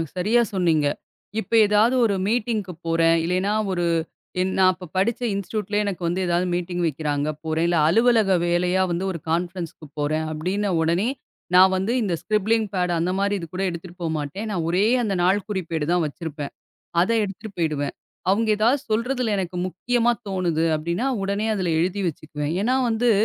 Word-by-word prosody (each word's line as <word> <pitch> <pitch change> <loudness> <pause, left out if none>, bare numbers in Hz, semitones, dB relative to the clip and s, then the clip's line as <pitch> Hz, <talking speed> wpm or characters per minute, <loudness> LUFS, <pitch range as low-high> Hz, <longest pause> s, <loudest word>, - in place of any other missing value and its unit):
சரியா 215 +7 +3
சொன்னீங்க. 165 -5 +2 0.5
இப்ப - - -7
ஏதாவது 215 +5 +3
ஒரு 200 -3 +1
மீட்டிங்க்கு 215 -5 -1
போறேன். 165 0 +3
இல்லைனா, 185 +4 0 0.2
ஒரு 175 -1 -1 0.8
நான் 185 -1 +6
அப்ப 180 0 -10
படிச்ச 230 +6 +1
இன்ஸ்டிட்யூட்ல 205 +1 -3
எனக்கு 180 -4 -2 0.2
ஏதாவது 175 +1 +1
மீட்டிங் 175 0 -2
வைக்கறாங்க, 150 -1 -1 0.2
போறேன். 160 +2 0 0.2
அலுவலக 220 0 +4
வேலையா 180 +2 +2
வந்து 175 +3 -1
ஒரு 170 - -5
கான்ஃபரன்ஸ்க்கு 170 -2 -3
போறேன் 155 +2 0
அப்படின்னு. 185 +7 -1
உடனே, 170 +8 +1 0.5
நான் 190 +1 +7
வந்து 195 +5 0
இந்த 185 -5 0
ஸ்கிரிப்ளிங் 215 +1 +1
பேட், 180 -1 +1
அந்த 175 +2 0
மாரி 200 0 +1 0.2
கூட 190 - -2
எடுத்துட்டு 170 +1 -8
போகமாட்டேன். 160 +6 -3
நான் 175 -5 -1
ஒரே 185 +4 +2 0.2
அந்த 200 -3 -1
நாள்குறிப்பேடு 185 -5 0
தான் 175 -2 +2
வச்சிருப்பேன். 150 -1 -6 0.5
அதை 230 +5 +1
எடுத்துட்டு 200 +2 -7
போயிடுவேன். 150 -3 -1 0.4
அவுங்க 220 +3 +2
ஏதாவது 245 +6 +3
சொல்றதுல 230 0 0
எனக்கு 180 -1 -3
முக்கியமா 240 +6 +1 0.2
தோணுது 175 -4 0
அப்படின்னா, 170 - -2 0.2
உடனே 200 +2 -1
அதுல 180 -3 -1
எழுதி 190 +3 0
வச்சிக்குவேன். 150 0 -4
ஏன்னா, 255 +4 +2
வந்து 230 +1 +2
185 Hz, 150 wpm, -23 LUFS, 165-210 Hz, 0.8 s, நான்